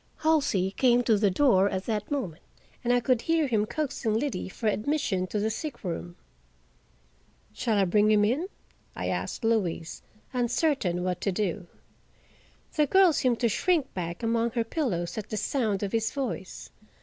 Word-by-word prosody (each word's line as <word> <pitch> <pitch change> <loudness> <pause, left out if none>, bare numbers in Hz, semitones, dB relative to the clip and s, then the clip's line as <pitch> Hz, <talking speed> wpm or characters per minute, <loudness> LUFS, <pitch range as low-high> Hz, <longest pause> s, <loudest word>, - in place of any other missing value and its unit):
Halsey 285 - +2
came 245 +3 +3
to 225 -2 +3
the 205 0 +3
door 200 -3 +4
at 190 -1 -3
that 210 -2 -2
moment 235 - -3 0.4
and 240 - +1
I 245 - +4
could 245 -1 +1
hear 325 -1 +2
him 215 -5 +1
coaxing 260 -7 -2
Liddy 230 -6 -2
for 225 - -8
admission 210 -4 0
to 210 - -3
the 215 +2 0
sick 295 +5 -6
room. 85 - -5 1.4
"Shall 225 -4 0
I 195 - +4
bring 210 +4 +3
him 210 -1 +4
in?" 275 - 0 0.5
I - - -3
asked - - -3
Louise, 180 -7 -1 0.3
uncertain 245 - 0
what 180 -1 -2
to 200 - 0
do. 185 -2 -2 1.1
The 300 -1 +3
girl 380 +1 +5
seemed 250 -4 +1
to 235 - +4
shrink 315 - +1
back 175 +3 -5
among 230 +1 +1
her 235 -2 +1
pillows 225 - -2
at 215 - -8
the 215 - -3
sound 215 -6 0
of 200 - -2
his 225 -1 0
voice. 260 -9 -5
225 Hz, 170 wpm, -27 LUFS, 195-260 Hz, 1.4 s, girl